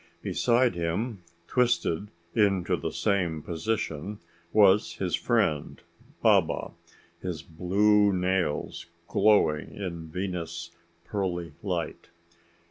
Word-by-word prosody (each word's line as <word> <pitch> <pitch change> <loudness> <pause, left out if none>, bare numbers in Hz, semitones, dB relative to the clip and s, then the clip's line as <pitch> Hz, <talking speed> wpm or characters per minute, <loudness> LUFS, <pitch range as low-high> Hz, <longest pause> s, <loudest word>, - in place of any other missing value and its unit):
Beside 120 0 +2
him, 90 +6 -2 0.3
twisted 120 -7 +1 0.3
into 100 -5 +2
the - - -3
same 85 -6 0
position, 95 0 -3 0.3
was 105 -1 +5
his - - -3
friend 75 -2 +1 0.4
Baba, - - +3 0.5
his - - -4
blue 100 +5 +3
nails 90 -2 -1 0.2
glowing 100 -8 +3
in 85 -5 -5
Venus' 85 -1 -4 0.3
pearly 90 -5 -3
light. 90 -4 -3
95 Hz, 90 wpm, -27 LUFS, 85-105 Hz, 0.5 s, was